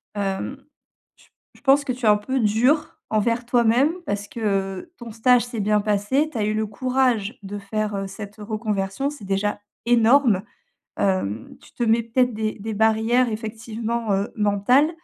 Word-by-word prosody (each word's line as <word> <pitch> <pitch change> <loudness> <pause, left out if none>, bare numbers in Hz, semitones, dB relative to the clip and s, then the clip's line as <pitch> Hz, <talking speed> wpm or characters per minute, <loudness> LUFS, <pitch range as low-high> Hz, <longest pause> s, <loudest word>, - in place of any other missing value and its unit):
hem, 200 +6 -2 0.6
j - - -24 0.3
je - - -20
pense 280 +1 +4
que 265 - -1
tu 245 -2 -5
es - - +6
un 210 - +6
peu 260 +6 -2
dur 245 +8 +2 0.2
envers 230 +3 +1
toi-même, 245 +4 +3
parce 205 0 -3
que, 235 - -9
heu, 195 - -2
ton 235 -2 -9
stage 245 +2 +3
s'est 240 -2 -6
bien 210 0 +2
passé, 215 +9 +1
tu 245 - -6
as 210 - 0
eu 215 - 0
le 220 0 0
courage 250 -1 0
de 200 +1 -6
faire, 210 +1 -3
heu, 195 0 -3
cette 200 +1 -9
reconversion, 215 +3 -2
c'est 290 -9 -10
déjà 195 +2 -1 0.3
énorme. 235 -3 +4 0.6
Hem, 115 - -1
tu - - -18
te 240 - -1
mets, 225 +1 +3
peut-être, 245 +1 +1
des 215 0 -2
des 220 +1 -4
barrières, 220 +3 +3
effectivement, 225 0 -3
heu, 195 +2 -1
mentales. 210 +8 +3
220 Hz, 175 wpm, -23 LUFS, 205-245 Hz, 0.6 s, es